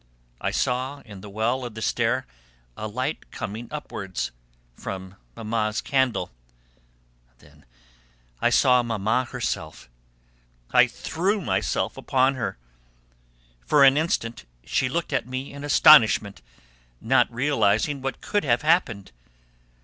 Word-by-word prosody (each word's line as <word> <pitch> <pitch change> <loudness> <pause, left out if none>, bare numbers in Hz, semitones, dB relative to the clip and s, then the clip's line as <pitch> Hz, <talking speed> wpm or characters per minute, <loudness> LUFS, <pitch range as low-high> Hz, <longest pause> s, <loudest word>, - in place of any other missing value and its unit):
I - - 0
saw 130 +3 -1
in 100 -4 -11
the 105 - -10
well 115 +5 -1
of 120 -3 -7
the 110 - -7
stair 120 +4 0 0.5
a 110 - -5
light 130 +7 -4
coming 110 +4 -6
upwards, 95 - -5 0.4
from 95 +5 -7 0.2
Mamma's 110 -1 -2
candle. 130 - 0 1.1
Then 75 +1 -22 0.7
I - - +4
saw 125 -1 +4
Mamma 115 +2 0
herself: 85 - -5 0.8
I - - +6
threw 190 +7 -2
myself 185 - -1
upon 130 +1 +2
her. 125 - -4 1.1
For 145 - +4
an 135 0 +7
instant 120 - -1 0.2
she 125 - 0
looked 165 +1 -3
at 125 -2 -1
me 130 +2 -5
in 140 0 -8
astonishment, 125 -8 +5 0.6
not 125 +1 +2
realising 135 +1 +1
what 135 0 -4
could 205 - -1
have 125 0 +1
happened. 140 - +1
125 Hz, 120 wpm, -24 LUFS, 110-140 Hz, 1.1 s, an